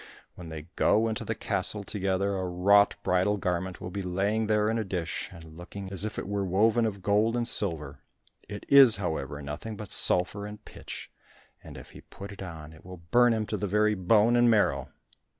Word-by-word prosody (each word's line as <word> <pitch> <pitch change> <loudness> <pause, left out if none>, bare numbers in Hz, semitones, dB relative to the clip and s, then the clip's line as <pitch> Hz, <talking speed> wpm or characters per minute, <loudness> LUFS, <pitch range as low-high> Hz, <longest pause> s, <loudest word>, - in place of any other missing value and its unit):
When 85 -2 -11
they 80 -1 -7
go 110 +2 +2
into 110 -1 -3
the - - -4
castle 105 -1 +2
together, 100 0 -2
a 95 -1 -3
wrought 100 +3 +3
bridal 90 +3 +1
garment 90 -1 -3
will 90 - -7
be 100 - -4
lying 100 +4 -1
there 105 0 +1
in 115 +1 0
a - - -1
dish, 90 -4 -4
and 85 - -12
looking 95 +3 -9
as 95 0 +1
if 110 0 -5
it - - -5
were 100 0 -2
woven 110 +5 +2
of 100 -3 -7
gold 105 +4 +1
and 120 -1 -1
silver; 75 - 0 0.5
it 105 -1 -8
is, 135 -5 +7
however, 75 -7 -4
nothing 75 +10 -7
but 105 -2 -9
sulphur 100 +3 +3
and 105 0 -11
pitch, - - -10 0.5
and - - -11
if - - -12
he - - -13
put 100 +1 -11
it 100 - -11
on, 80 -4 -9
it 80 - -17
will 90 -2 -12
burn 120 0 +5
him 110 -1 -1
to 105 - -4
the 105 +1 -3
very 105 +2 +2
bone 105 +4 +3
and 120 0 +4
marrow." 110 -3 +1
100 Hz, 205 wpm, -27 LUFS, 90-110 Hz, 0.5 s, is